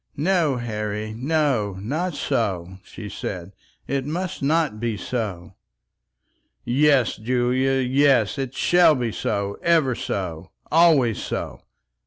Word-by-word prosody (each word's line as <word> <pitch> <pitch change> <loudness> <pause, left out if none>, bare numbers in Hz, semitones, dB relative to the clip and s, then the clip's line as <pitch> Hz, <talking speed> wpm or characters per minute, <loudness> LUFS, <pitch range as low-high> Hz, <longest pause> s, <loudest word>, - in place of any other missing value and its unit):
"No, 160 -2 +2
Harry, 105 -2 -4
no; 135 -6 0
not 155 - -2
so," 95 -4 -2
she 105 - -9
said, 95 -2 -6 0.3
"it 135 0 -1
must 170 +5 -4
not 150 -5 +1
be 115 -2 -2
so." 100 -7 -4 1.1
"Yes, 135 -1 +3
Julia, 125 +3 +1
yes; 135 -2 +2
it 135 -1 -4
shall 175 -3 +5
be 120 -3 -2
so; 100 -1 -2
ever 160 -6 +3
so, 90 -6 -4 0.2
always 155 - +4
so." - - -5
125 Hz, 115 wpm, -23 LUFS, 105-150 Hz, 1.1 s, shall